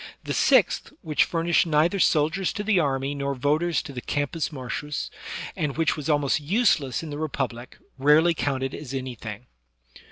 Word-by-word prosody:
The -, -, -3 dB
sixth, -, -, +3 dB
which 155 Hz, -3 st, +2 dB
furnished 170 Hz, 0 st, +1 dB
neither 160 Hz, +5 st, +2 dB
soldiers 165 Hz, +3 st, +2 dB
to 205 Hz, -, -3 dB
the 210 Hz, -3 st, +3 dB
army, 135 Hz, -2 st, 0 dB
nor 140 Hz, -1 st, -2 dB
voters 150 Hz, +4 st, +1 dB
to 140 Hz, -, -9 dB
the 125 Hz, -, -5 dB
Campus 145 Hz, +4 st, -2 dB
Martiu^ 145 Hz, +1 st, -5 dB, 0.4 s
and 145 Hz, -2 st, -2 dB
which 165 Hz, -1 st, +2 dB
was 150 Hz, -1 st, -5 dB
almost 145 Hz, 0 st, +2 dB
useless 160 Hz, -, +1 dB
in 155 Hz, -, -6 dB
the 145 Hz, -, -5 dB
Republic, 130 Hz, -5 st, -4 dB, 0.2 s
rarely 150 Hz, +5 st, +5 dB
counted 135 Hz, -4 st, -2 dB
as 135 Hz, -3 st, -6 dB
anything. 120 Hz, -4 st, -6 dB
150 Hz, 160 wpm, -25 LUFS, 135-165 Hz, 0.4 s, rarely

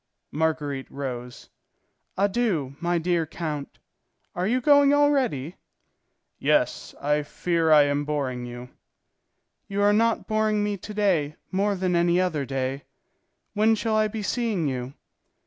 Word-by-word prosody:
Marguerite 150 Hz, -3 st, -2 dB
rose. 125 Hz, -3 st, -6 dB, 0.7 s
"Adieu, 195 Hz, -, 0 dB
my 175 Hz, +1 st, 0 dB
dear 170 Hz, -1 st, 0 dB
count. 155 Hz, -3 st, -5 dB, 0.6 s
Are 180 Hz, +1 st, -1 dB
you 250 Hz, +4 st, +2 dB
going 285 Hz, +2 st, +5 dB
already?" 260 Hz, -, +1 dB, 0.8 s
"Yes, -, -, 0 dB
I 150 Hz, +1 st, +1 dB
fear 165 Hz, +2 st, 0 dB
I 150 Hz, -1 st, +8 dB
am 145 Hz, 0 st, 0 dB
boring 135 Hz, -5 st, -3 dB
you." 120 Hz, +1 st, -9 dB, 1.0 s
"You 200 Hz, +1 st, -1 dB
are 205 Hz, 0 st, +5 dB
not 225 Hz, +1 st, +2 dB
boring 215 Hz, -1 st, +1 dB
me 205 Hz, 0 st, -1 dB
to 200 Hz, +2 st, -9 dB
day 170 Hz, -8 st, +1 dB, 0.2 s
more 200 Hz, +2 st, +1 dB
than 185 Hz, -1 st, 0 dB
any 170 Hz, +1 st, +3 dB
other 160 Hz, -7 st, -1 dB
day. 135 Hz, 0 st, -3 dB, 0.7 s
When 215 Hz, +1 st, +3 dB
shall 220 Hz, 0 st, -1 dB
I 215 Hz, 0 st, +3 dB
be 215 Hz, 0 st, -5 dB
seeing 215 Hz, -8 st, -1 dB
you?" 130 Hz, 0 st, -4 dB
175 Hz, 135 wpm, -25 LUFS, 145-210 Hz, 1.0 s, I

